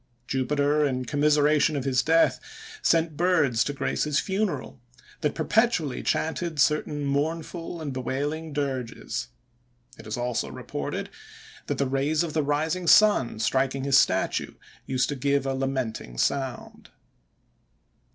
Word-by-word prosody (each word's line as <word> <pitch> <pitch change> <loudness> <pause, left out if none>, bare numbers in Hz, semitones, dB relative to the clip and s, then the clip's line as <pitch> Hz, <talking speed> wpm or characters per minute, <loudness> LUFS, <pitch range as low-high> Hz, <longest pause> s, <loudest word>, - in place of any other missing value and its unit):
Jupiter, 145 +3 +1
in 130 -3 -1
commiseration 150 +2 +3
of 140 - -2
his 130 -2 +2
death, 165 +1 +3 0.4
sent 165 -2 +2
birds 155 -9 +2
to - - -1
grace 140 - -1
his 150 -2 +1
funeral, 190 - -2 0.4
that 150 - -1
perpetually 170 - +1
chanted 160 -1 -1
certain 145 +1 +1
mournful 165 +4 -2
and 150 -4 -4
bewailing 145 +5 -3
dirges. 135 -5 -3 0.7
It 110 - -11
is 110 - -3
also 120 -1 -2
reported, - - -5 0.6
that - - -2
the 140 - +1
rays 140 +4 +1
of 165 -3 -4
the 155 - +2
rising 155 +5 -1
sun, 205 - +5
striking 135 +4 0
his 140 0 +5
statue, - - 0 0.3
used 130 -1 +1
to 145 - -2
give 140 +1 0
a 135 - 0
lamenting 130 - -3
sound. 135 - -2
145 Hz, 130 wpm, -26 LUFS, 130-160 Hz, 0.7 s, sun